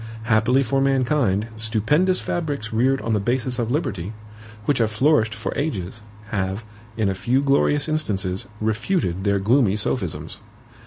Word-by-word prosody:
Happily 120 +4 +3
for 135 +3 0
mankind, 130 -6 +2
stupendous 110 - +2
fabrics 145 -10 -3
reared 130 +4 +2
on 115 - -1
the 105 - +2
basis 125 +3 -1
of 115 -1 -1
liberty, 110 - -2 0.5
which 145 -4 +1
have 115 -2 +2
flourished 110 -1 +2
for - - -4
ages, 110 - -3 0.3
have, 100 +1 -2 0.3
in 110 -2 +1
a 95 - +1
few 120 +7 +1
glorious 140 +1 +2
instances, 100 -12 -1
refuted 110 - -1
their 100 0 +3
gloomy 105 +1 +3
sophisms. 85 - -3
115 Hz, 145 wpm, -22 LUFS, 105-135 Hz, 0.5 s, Happily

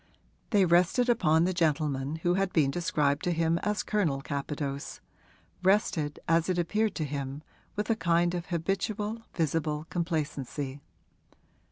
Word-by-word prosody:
They 200 -4 +4
rested 180 +8 +3
upon 165 -9 +4
the 185 +2 +1
gentleman 150 -4 0
who 175 - +3
had 195 0 +1
been 145 -4 +3
described 150 -3 0
to 180 - +2
him 165 0 +1
as 210 +2 -1
Colonel 160 -11 0
Capadose 140 0 -4 0.6
rested, 180 -6 +1
as 165 +1 +3
it 180 - +1
appeared 210 +5 +1
to 155 - -1
him, 140 0 -4 0.3
with 210 - -2
a - - +3
kind 175 -3 +2
of 175 -1 -4
habitual, 200 +5 -2
visible 155 -2 0
complacency. 145 -5 -3
165 Hz, 140 wpm, -29 LUFS, 150-185 Hz, 0.6 s, They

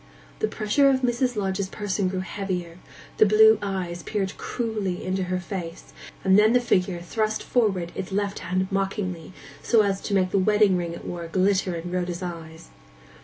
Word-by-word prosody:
The - - +1
pressure 215 +7 +2
of 260 -1 +2
Mrs. 245 0 0
Lodge's 195 -1 -2
person 200 -2 -2
grew 185 0 -2
heavier; 185 -3 -4 0.4
the 215 - +6
blue 220 +1 +6
eyes 185 -4 -3
peered 195 +2 -3
cruelly 215 -6 -3
into 185 0 -1
her 185 0 -1
face; 175 -2 -7 0.3
and 190 +1 +5
then 215 +2 +5
the 250 - +5
figure 185 -6 +1
thrust 215 +4 -2
forward 195 -8 0
its 190 - -6
left 200 +1 -1
hand 185 +1 -1
mockingly, 195 -3 -2 0.3
so 225 -3 +4
as 195 -1 -1
to 200 - -2
make 185 -1 +2
the 200 - +2
wedding 210 0 +4
ring 170 -1 -2
it 170 - -9
wore 170 -1 -5
glitter 185 +1 +1
in 170 +1 -6
Rhoda's 180 0 -2
eyes. 165 -2 -8
190 Hz, 175 wpm, -25 LUFS, 180-210 Hz, 0.4 s, the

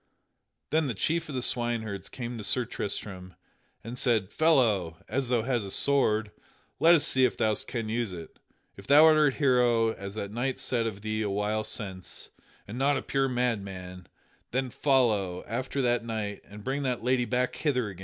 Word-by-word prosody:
Then 155 -1 +2
the 120 - -3
chief 165 - -1
of 140 - -5
the 125 - -1
swineherds 110 -6 -1
came 120 -1 -6
to - - -6
Sir 120 +5 +3
Tristram, 95 -4 -5 0.5
and 120 +3 -6
said: 110 -6 +1
"Fellow, 110 - +2
as 135 -1 -1
thou 120 -2 +1
hast 120 -3 0
a 100 - -6
sword, 110 -4 +1 0.5
let 170 +1 +7
us 150 -2 +3
see 130 - +3
if 125 - +2
thou 110 -1 +2
canst 110 +1 -3
use 115 -3 -1
it. 85 -3 -10 0.4
If 100 - -13
thou 150 +3 +8
art 155 -3 +5
a - - -12
hero 120 -5 +3
as 100 0 -8
that 100 -2 -4
knight 125 +4 -2
said 115 -3 -1
of 100 -2 -6
thee 110 0 -2
a 105 - -1
while 105 +2 -1
since, 95 -5 -7 0.4
and 110 +5 -6
not 140 +1 +2
a - - -4
pure 135 0 0
madman, 100 -7 -3 0.4
then 130 0 -2
follow 110 -11 +1
after 130 +4 -2
that 120 -1 +1
knight 110 -3 -4
and 105 0 -12
bring 135 +4 -2
that 125 -4 -2
lady 125 0 +2
back 125 +1 -1
hither 125 -8 0
again." 95 -2 -11
115 Hz, 190 wpm, -28 LUFS, 105-130 Hz, 0.5 s, thou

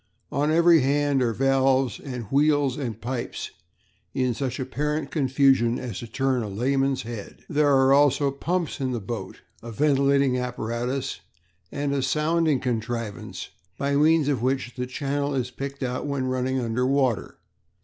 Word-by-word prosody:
On 145 +2 +1
every 170 +1 +6
hand 140 0 +2
are 120 -2 +2
valves 135 +1 +2
and 125 -4 -6
wheels 145 -2 +3
and 120 -7 -4
pipes 120 +1 -4 0.6
in 130 -2 +1
such 130 +2 -3
apparent 145 +3 -2
confusion 135 -4 +3
as 120 -6 -5
to 120 - -7
turn 130 +2 0
a 105 - -4
layman's 135 +6 0
head. 115 -3 -8
"There 150 -1 +2
are 135 -1 +5
also 140 0 +4
pumps 165 +3 -2
in 130 -1 -1
the 120 - -2
boat, 100 -1 -6 0.2
a 115 - -8
ventilating 140 0 +2
apparatus, 125 0 -3 0.5
and 140 0 -2
a 140 - 0
sounding 155 +2 +1
contrivance, 115 -3 -4 0.3
by 140 0 0
means 155 0 +4
of 140 -6 0
which 130 -1 -1
the 125 0 -3
channel 140 +2 -2
is 125 -1 -2
picked 140 +1 -6
out 125 +3 -2
when 140 -2 -1
running 130 0 -1
under 120 +1 0
water. 130 -4 0
135 Hz, 155 wpm, -25 LUFS, 125-140 Hz, 0.6 s, every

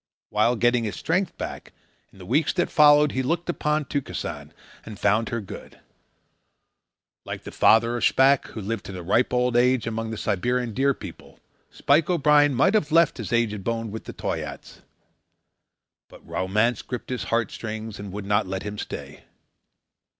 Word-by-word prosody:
While 110 +3 +2
getting 120 +1 +2
his 105 -3 -4
strength 180 +3 -1
back, - - -7 0.4
in - - -20
the 95 - -11
weeks 140 - +1
that 175 - -1
followed, 150 -1 +6
he 130 - -1
looked 170 +6 -2
upon 150 -2 -1
Tukesan 140 -1 -5 0.3
and 105 - -9
found 110 +4 +1
her 115 - -2
good. 100 -1 -10 1.4
Like - - -7
the - - -8
father 115 +2 +4
of - - -4
Shpack, 135 +1 +4
who 110 - -8
lived 110 +3 -4
to 95 - -7
a 90 - -7
ripe 115 +8 +2
old 125 -1 +1
age 125 0 +3
among 115 0 -3
the 110 - -5
Siberian 115 +5 -1
Deer 135 +3 +2
People, - - -11 0.3
Spike 150 +4 +2
O'Brien 145 -4 +4
might 190 - +3
have 170 -8 +1
left 165 -1 +4
his 110 - -5
aged 110 -4 0
bones 115 0 -3
with 110 - -7
the - - -7
Toyaats. - - -6 1.3
But - - -16
romance 105 +6 0
gripped 125 0 -7
his 125 - -3
heart 115 0 0
strings 110 -1 -6
and 100 -1 -7
would 100 +1 -6
not 100 0 +1
let 95 0 -4
him 105 0 -6
stay. - - -8
120 Hz, 170 wpm, -24 LUFS, 105-140 Hz, 1.4 s, followed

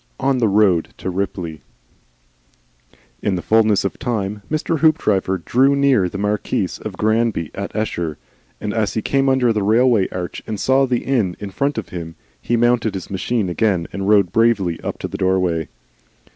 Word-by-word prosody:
ON 135 -1 +1
THE 115 - +3
ROAD 100 -5 +2
TO 95 - -4
RIPLEY 90 -4 -4 1.6
In 100 - 0
the 90 - -4
fulness 110 -3 +3
of 95 - -3
time, 105 -5 -2
Mr. 155 +1 -1
Hoopdriver 105 - +2
drew 130 +10 +2
near 135 -10 +3
the 95 - -6
Marquis 105 +1 -1
of - - -6
Granby 110 -6 0
at 100 0 -6
Esher, 85 -8 -2 0.4
and 105 -1 -3
as 110 -3 -1
he 110 - -1
came 135 0 +1
under 125 -3 +3
the 105 - 0
railway 110 0 +3
arch 90 -1 -5
and 105 -2 -4
saw 135 +1 +3
the 125 -2 -1
inn 110 -10 0
in 100 -1 -6
front 140 +9 -1
of - - -4
him, 80 -2 -7 0.3
he 120 - 0
mounted 120 -3 +2
his 95 - -7
machine 105 +2 -1
again 90 -1 0
and 100 0 -2
rode 100 -5 +4
bravely 100 -7 +2
up - - -4
to - - -4
the - - -6
doorway. 90 -4 +1
105 Hz, 175 wpm, -20 LUFS, 95-120 Hz, 1.6 s, rode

